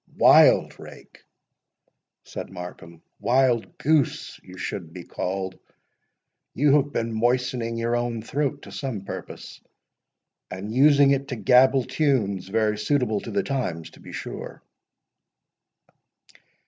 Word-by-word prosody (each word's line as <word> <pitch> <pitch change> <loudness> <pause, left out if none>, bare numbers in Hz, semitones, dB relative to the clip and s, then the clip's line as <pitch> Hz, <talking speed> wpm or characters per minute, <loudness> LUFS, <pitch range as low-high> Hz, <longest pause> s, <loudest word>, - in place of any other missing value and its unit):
"Wildrake!" - - +3 1.0
said - - -8
Markham—"Wildgoose 120 - -1
you 95 0 -13
should 85 -4 -5
be 90 0 -9
called. 95 +1 -4 1.0
You 145 +2 +3
have 145 0 -1
been 115 -3 -2
moistening 120 0 0
your 115 +1 0
own 120 -2 -2
throat 140 +3 -2
to 100 - -11
some 105 +1 -4
purpose, 95 - -9 0.9
and 100 +4 -6
using 140 +1 +5
it 140 0 0
to 130 - -4
gabble 125 +4 +4
tunes 115 - 0
very 105 +1 0
suitable 110 -2 0
to - - -8
the 200 - -1
times, 120 - -3
to - - -18
be - - -12
sure!" - - -8
115 Hz, 110 wpm, -24 LUFS, 100-135 Hz, 1.0 s, using